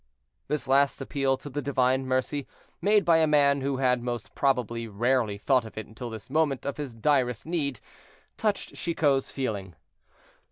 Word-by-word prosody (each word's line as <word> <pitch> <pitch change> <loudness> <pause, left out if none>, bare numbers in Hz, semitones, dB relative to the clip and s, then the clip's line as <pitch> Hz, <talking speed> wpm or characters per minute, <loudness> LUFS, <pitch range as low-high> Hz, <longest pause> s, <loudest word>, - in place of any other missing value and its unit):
This 150 -1 -2
last 140 +1 +3
appeal 135 -1 0
to - - -11
the 145 +1 -3
divine 130 -1 +1
mercy, 130 +2 -1 0.3
made 210 0 +4
by 165 -1 +5
a 160 -1 +4
man 140 -2 +4
who 135 0 -1
had 125 -2 +2
most 120 -2 -4
probably 120 -4 0
rarely 115 0 +1
thought 130 +4 +2
of 110 - -11
it 110 - -4
until 120 +2 -8
this 110 -2 -8
moment 145 -2 0
of 140 - -3
his 140 -6 -5
direst 125 -1 +1
need, 150 -7 -2 0.6
touched 210 -2 -1
Chicot's 145 -5 +1
feeling. 100 - -4
135 Hz, 165 wpm, -27 LUFS, 120-145 Hz, 0.6 s, by